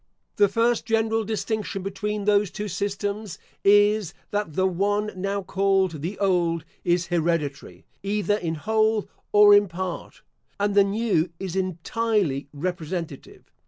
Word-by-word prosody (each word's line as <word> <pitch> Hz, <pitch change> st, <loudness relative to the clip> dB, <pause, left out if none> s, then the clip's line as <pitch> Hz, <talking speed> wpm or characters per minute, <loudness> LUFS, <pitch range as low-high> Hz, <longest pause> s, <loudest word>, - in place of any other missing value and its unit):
The 205 Hz, -, +6 dB
first 230 Hz, +4 st, +1 dB
general 225 Hz, 0 st, +1 dB
distinction 215 Hz, -2 st, -3 dB
between 200 Hz, +1 st, -3 dB
those 205 Hz, -1 st, +3 dB
two 210 Hz, +3 st, -5 dB
systems, 200 Hz, +1 st, -3 dB, 0.3 s
is, 205 Hz, -2 st, +4 dB, 0.2 s
that 205 Hz, -6 st, -2 dB
the 185 Hz, +4 st, +1 dB
one 205 Hz, +3 st, 0 dB
now 195 Hz, +1 st, -2 dB
called 190 Hz, -4 st, +1 dB
the 180 Hz, +6 st, -4 dB
old 175 Hz, -4 st, +1 dB, 0.2 s
is 175 Hz, 0 st, +1 dB
hereditary, 160 Hz, -4 st, -2 dB, 0.2 s
either 205 Hz, +1 st, 0 dB
in 165 Hz, -5 st, -3 dB
whole 220 Hz, +4 st, +1 dB, 0.2 s
or 205 Hz, 0 st, +7 dB
in 205 Hz, 0 st, +6 dB
part; 180 Hz, 0 st, -6 dB, 0.4 s
and 205 Hz, 0 st, +1 dB
the 200 Hz, 0 st, +6 dB
new 200 Hz, -4 st, 0 dB
is 190 Hz, -2 st, -5 dB
entirely 185 Hz, -, -1 dB
representative. 165 Hz, -1 st, -5 dB
200 Hz, 130 wpm, -24 LUFS, 175-210 Hz, 0.4 s, or